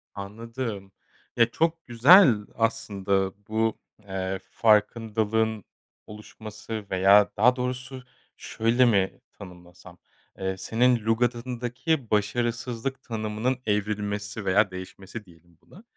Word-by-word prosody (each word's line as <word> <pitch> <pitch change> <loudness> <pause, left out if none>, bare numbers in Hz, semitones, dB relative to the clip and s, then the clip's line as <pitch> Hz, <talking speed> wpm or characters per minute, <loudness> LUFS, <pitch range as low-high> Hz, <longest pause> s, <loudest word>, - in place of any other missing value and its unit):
Anladım. 105 0 -6 0.5
E, 115 - +6
çok 165 +7 -1
güzel 130 - +7 0.2
aslında 100 -4 -1
bu, 110 0 0 0.3
eee, 95 0 -3
farkındalığın 110 0 +1 0.4
oluşması 105 0 -8
veya 100 +2 +5
daha 125 +4 +5
doğrusu, 125 +1 -5 0.3
şöyle 115 +3 +1
mi 100 -5 +1
tanımlasam, 90 -2 -14 0.4
eee, 95 0 -3
senin 120 +2 +1
lügatındaki 120 +4 -1
başarısızlık 120 +4 -2
tanımının 110 +3 -2
evrilmesi 105 0 -2
veya 95 +1 +3
değişmesi 95 +3 -9
diyelim 85 -1 -22
buna. 195 - -17
110 Hz, 95 wpm, -26 LUFS, 100-120 Hz, 0.5 s, güzel